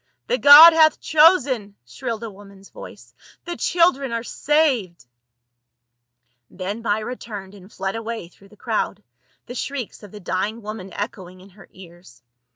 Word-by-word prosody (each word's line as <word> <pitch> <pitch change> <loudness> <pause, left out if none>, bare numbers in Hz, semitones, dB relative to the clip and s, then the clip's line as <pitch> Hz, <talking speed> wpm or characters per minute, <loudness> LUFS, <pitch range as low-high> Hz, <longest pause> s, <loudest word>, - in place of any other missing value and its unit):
The - - -1
god 300 +4 +10
hath 315 -1 +4
chosen!" 280 - +2
shrilled 230 - -6
a 225 - -7
woman's 195 0 -16
voice. - - -13 0.2
" - - -28
The 345 -1 -5
children 335 -8 +1
are 230 0 -3
saved 250 - -1 0.8
!" 120 0 -52
Then 195 +4 -6
Myra 220 +2 -2
turned 205 -5 -10
and 195 0 -16
fled 195 +1 -5
away 225 -4 -6
through 195 +3 -22
the 210 - -20
crowd, - - -3 0.4
the - - -9
shrieks 255 -1 -6
of 205 - -13
the 210 - -12
dying 200 +5 -4
woman 210 -3 -8
echoing 185 -3 -7
in 190 +2 -17
her 195 -1 -18
ears. 175 -9 -17
210 Hz, 160 wpm, -21 LUFS, 185-255 Hz, 0.8 s, god